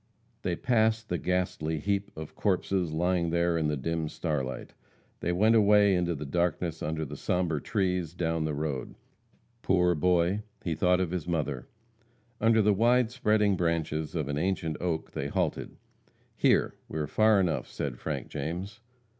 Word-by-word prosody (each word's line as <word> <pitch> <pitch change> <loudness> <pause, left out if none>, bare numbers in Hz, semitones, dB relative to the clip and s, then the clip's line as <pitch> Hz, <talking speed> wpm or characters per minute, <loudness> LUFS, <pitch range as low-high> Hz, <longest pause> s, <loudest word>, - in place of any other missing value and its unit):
They 90 - -1
passed 110 -2 +1
the 90 - -1
ghastly 90 -3 -1
heap 100 +5 -1
of 80 -1 -7
corpses, 95 -3 0
lying 85 +1 +1
there 85 0 +1
in 80 -2 +1
the 75 -1 -1
dim 80 +3 -2
starlight. 65 -7 -3 0.5
They 85 - -1
went 105 +6 +4
away, 105 -2 +5
into 85 -2 +1
the 75 +1 -6
darkness 85 +1 -1
under 80 +1 -2
the - - -7
sombre 90 -5 -1
trees, 90 -5 -1
down 80 -2 -1
the 75 -1 -2
road. 70 -3 -3 0.7
Poor 90 -2 +3
boy, 90 +4 +2 0.2
he 85 - -1
thought 90 +3 +2
of 90 -3 -1
his 90 -3 -3
mother. 75 -7 -2 0.7
Under 115 -1 +4
the 105 0 +4
wide 120 +3 +3
spreading 105 -5 +2
branches 80 -3 -1
of 75 -4 -1
an 70 0 -2
ancient 85 -3 -1
oak 85 -3 -2
they 70 - -3
halted. - - -2 0.6
"Here! - - +3 0.2
we - - -5
are 75 - 0
far 110 +6 +4
enough," 85 -5 0
said - - -5
Frank - - -4
James. 90 +9 -5
85 Hz, 165 wpm, -29 LUFS, 80-95 Hz, 0.7 s, away